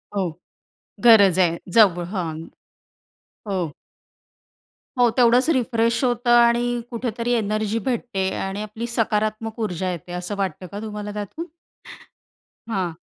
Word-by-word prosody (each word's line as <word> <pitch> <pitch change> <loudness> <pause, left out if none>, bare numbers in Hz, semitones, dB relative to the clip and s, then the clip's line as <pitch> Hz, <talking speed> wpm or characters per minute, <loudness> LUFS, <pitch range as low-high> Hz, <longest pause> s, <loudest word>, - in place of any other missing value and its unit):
हो. 195 - +1 0.8
गरज 200 -5 +7
आहे. 170 -2 +3 0.2
जव 185 -5 +6
हां. 165 -4 -2 1.2
हो. 190 -2 -1 1.4
हो. 245 -1 +5
तेवढंच 245 +4 +4
रिफ्रेश 230 -3 +1
होतं 245 0 0
आणि 240 0 +3
कुठेतरी 235 0 -3
एनर्जी 215 0 0
भेटते 200 -6 -1
आणि 195 +2 -3
आपली 220 +3 -6
सकारात्मक 220 -1 -1
ऊर्जा 185 -3 -2
येते, 175 +1 -7
असं 180 +3 -4
वाटतं 185 -2 -3
का 205 - -5
तुम्हाला 210 -1 -5
त्यातून? 210 - -5 1.2
हां. 185 -7 -2
215 Hz, 115 wpm, -22 LUFS, 190-235 Hz, 1.4 s, गरज